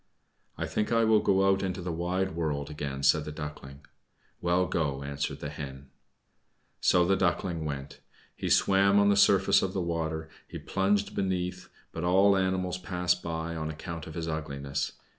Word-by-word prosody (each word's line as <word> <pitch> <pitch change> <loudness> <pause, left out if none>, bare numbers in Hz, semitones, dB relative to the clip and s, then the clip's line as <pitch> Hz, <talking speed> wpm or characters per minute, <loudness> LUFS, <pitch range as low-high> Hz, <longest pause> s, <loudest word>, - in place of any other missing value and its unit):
"I - - -2
think 105 - -2
I 115 0 +4
will 110 -1 +5
go 95 -1 +3
out 95 0 +3
into 95 -1 -2
the 90 0 -3
wide 90 +3 -1
world 75 -4 -2
again," 70 -2 -5
said 75 +2 +4
the 75 - -6
Duckling. 75 -2 -8 0.6
"Well, 90 +1 +2
go," 70 -6 -1
answered 70 0 -4
the 75 - -4
Hen. 70 -2 -8 0.9
So 90 -1 +4
the 95 +2 +3
Duckling 85 -3 0
went. 70 -2 -5 0.4
He - - -3
swam 100 +1 +4
on 100 0 +5
the 100 - +4
surface 100 -1 +5
of 95 - -2
the - - -1
water, 80 -2 -2 0.2
he - - -7
plunged 100 +1 0
beneath, 90 -2 -2 0.2
but 85 - -5
all 95 +3 +5
animals 95 -1 0
passed 90 -1 0
him 85 - -7
by, 80 0 -3
on 80 -1 -3
account 80 +1 -6
of 80 - -9
his 85 -1 -3
ugliness. 70 -3 -3
85 Hz, 180 wpm, -29 LUFS, 75-95 Hz, 0.9 s, will